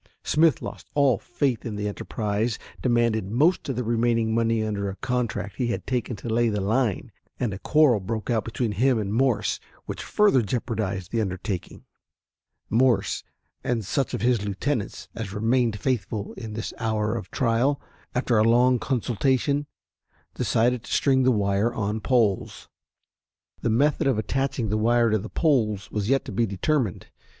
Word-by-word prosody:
Smith 155 -3 +3
lost - - -7
all 135 -7 +4
faith 130 -5 -1
in 110 -3 -4
the 105 0 -2
enterprise, 105 +2 -2 0.2
demanded 115 -5 +1
most 145 - +2
of 135 - -1
the 125 - -1
remaining 115 -1 +1
money 115 -1 +1
under 100 -2 -2
a 95 - -6
contract 115 -4 -2
he 125 - 0
had 120 - -3
taken 125 -2 -2
to 105 - -9
lay 115 +1 +2
the 105 -1 -1
line, 110 +1 0 0.3
and 115 -5 -1
a 95 - -6
quarrel 150 -6 +4
broke 110 +2 -4
out 115 -4 +1
between 115 +1 -2
him 125 +4 +2
and 105 -2 -2
Morse 125 -2 +1 0.3
which - - -5
further 205 -12 +3
jeopardized 105 -5 -3
the 115 - +1
undertaking. 95 -1 -4 0.8
Morse 115 -3 +2 0.4
and 115 -4 -1
such 135 +6 -1
of - - -5
his 120 -4 +2
lieutenants 105 +3 -3
as 105 -3 -5
remained 115 0 +1
faithful 110 -5 -2
in 110 -3 -7
this 110 +1 -4
hour 110 -1 0
of 110 - -5
trial, 130 +3 +1 0.4
after 125 -2 +2
a - - +5
long 120 +2 +4
consultation, 130 +4 0 0.7
decided 120 +1 +1
to - - -10
string 135 -2 +3
the 130 0 +4
wire 100 +1 +1
on 105 -1 -2
poles. 115 -7 +1 0.9
The - - 0
method 140 +6 +2
of 130 -5 +2
attaching 130 0 -1
the 105 - +1
wire 115 +1 +3
to 110 - +2
the 110 - -7
poles 110 - +1
was 105 0 -2
yet 135 0 +2
to - - -6
be 115 -1 +1
determined. 105 - -1
115 Hz, 165 wpm, -25 LUFS, 105-125 Hz, 0.9 s, a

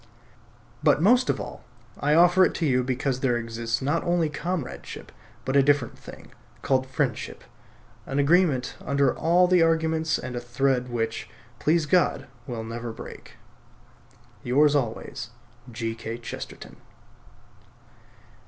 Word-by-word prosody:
But - - +4
most 245 +9 +4
of - - +1
all - - -7 0.4
I 150 +1 +2
offer 175 +2 +6
it - - +2
to 165 - -1
you 125 -3 +2
because 130 +1 -1
there 125 -3 +1
exists 115 +1 -3
not 145 +5 0
only 175 -2 +1
comradeship, 150 - -5 0.3
but 130 - -1
a - - +7
very - - +5
different 145 -5 +2
thing, - - -12 0.3
called 130 -1 +1
friendship; 130 -2 -2 0.6
an 135 - -3
agreement 145 -3 +2
under 140 +1 +2
all 175 +2 +4
the 180 -1 +4
arguments 160 -1 +2
and 130 -1 -6
a - - -2
thread 125 +1 0
which, 115 -2 -3 0.3
please 160 +1 +2
God, 175 +1 +2 0.2
will 115 -3 -4
never 115 +1 -5
break. - - -10 1.1
Yours 145 +4 +4
always, 120 -4 -2 0.4
G. 115 -1 -3
K. 115 0 -6
Chesterton. 120 - -8
135 Hz, 135 wpm, -25 LUFS, 120-160 Hz, 1.1 s, a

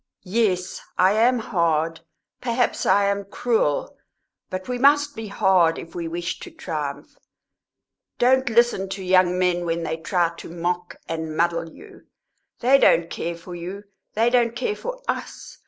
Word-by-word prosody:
"Yes, 185 -3 0 0.2
I 185 +1 +5
am 240 +4 +3
hard; 165 -7 0 0.4
perhaps 245 0 0
I 200 0 +4
am 200 0 0
cruel; 200 -6 0 0.5
but 185 0 -5
we 250 -1 -3
must 290 +2 +4
be 225 -1 -6
hard 185 -4 +3
if 165 - -9
we 170 -1 -4
wish 170 +1 -4
to - - -9
triumph. 150 -5 -6 1.0
Don't 260 +1 +3
listen 230 -4 +2
to 195 0 -5
young 185 -1 +3
men 180 -1 +1
when 170 0 -2
they 160 0 -2
try 170 +1 0
to - - -9
mock 175 +1 -3
and 160 -1 -4
muddle 170 0 0
you. - - -15 0.5
They 265 +3 +5
don't 165 -8 +4
care 170 0 -4
for 175 +2 -10
you; 180 +4 -7 0.3
they 230 +3 +3
don't 235 -2 +2
care 425 - -1
for - - -6
us. - - -5
185 Hz, 155 wpm, -23 LUFS, 170-235 Hz, 1.0 s, I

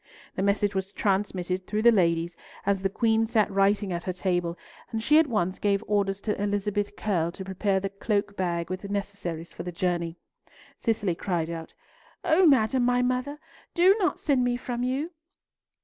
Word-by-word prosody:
The - - -2
message 200 +1 +2
was 190 0 -2
transmitted 190 -3 -1
through 215 0 -1
the 235 - +8
ladies 170 -4 +2 0.3
as 200 -1 +1
the 195 - +1
Queen 225 +2 +2
sat 220 -2 +2
writing 195 0 +2
at 170 - -2
her 185 - -3
table, 175 -2 -1 0.3
and 220 -1 -3
she 300 +5 +6
at 320 - +3
once 185 -6 -1
gave 200 0 +1
orders 200 -1 0
to 210 -2 -2
Elizabeth 205 0 -1
Curll 170 -6 0
to 190 - -7
prepare 190 +1 0
the 195 +1 -3
cloak 200 0 -1
bag 170 -2 -2
with 185 +2 -5
necessaries 200 -5 -4
for - - -7
the 180 - -5
journey. 175 -1 -1 0.6
Cicely 220 -6 0
cried 170 -2 -2
out, 165 -1 -7 0.5
"O 345 +3 +5
madam 255 -2 +4
my 245 0 +3
mother, 255 +3 -1 0.4
do 370 +3 +6
not 370 - +1
send 275 -5 +1
me 245 0 +1
from 245 -1 -4
you!" 265 +7 -1
200 Hz, 180 wpm, -27 LUFS, 185-225 Hz, 0.6 s, the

